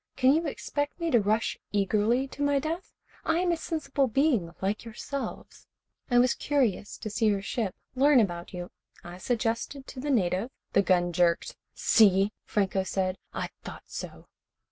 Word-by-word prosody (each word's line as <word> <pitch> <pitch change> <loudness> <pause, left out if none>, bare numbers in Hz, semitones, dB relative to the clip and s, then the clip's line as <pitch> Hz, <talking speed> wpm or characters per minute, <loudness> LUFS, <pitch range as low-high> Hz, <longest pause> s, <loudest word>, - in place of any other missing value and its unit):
Can 260 +1 +5
you 325 +1 +1
expect 290 +2 -3
me 335 -1 -1
to 240 - +6
rush 215 +3 0
eagerly 210 +6 +2
to 285 - -8
my 285 0 +3
death? 320 +6 -3 0.3
I 325 - +1
am 355 0 +2
a - - +2
sensible 315 -4 -1
being 245 - +2
like 200 +2 -1
yourselves. 250 +4 -6 0.4
I 245 - +3
was 245 0 +5
curious 250 -8 0
to 215 - -5
see 220 +1 +1
your 200 -2 +1
ship, 210 -2 -2 0.2
learn 275 +1 +5
about 175 -5 -1
you. 175 -1 -6 0.3
I 175 +1 -9
suggested 235 +5 -2
to 265 - -9
the 290 +3 -3
native 195 -3 +1
" - - -57
The 200 - +5
gun 175 -2 +2
jerked. 170 0 +2 0.2
"See," 200 -1 +4
Franco 195 -2 +1
said. 190 0 -1
"I - - -3
thought - - -8
so." - - -8
230 Hz, 170 wpm, -28 LUFS, 195-280 Hz, 0.4 s, to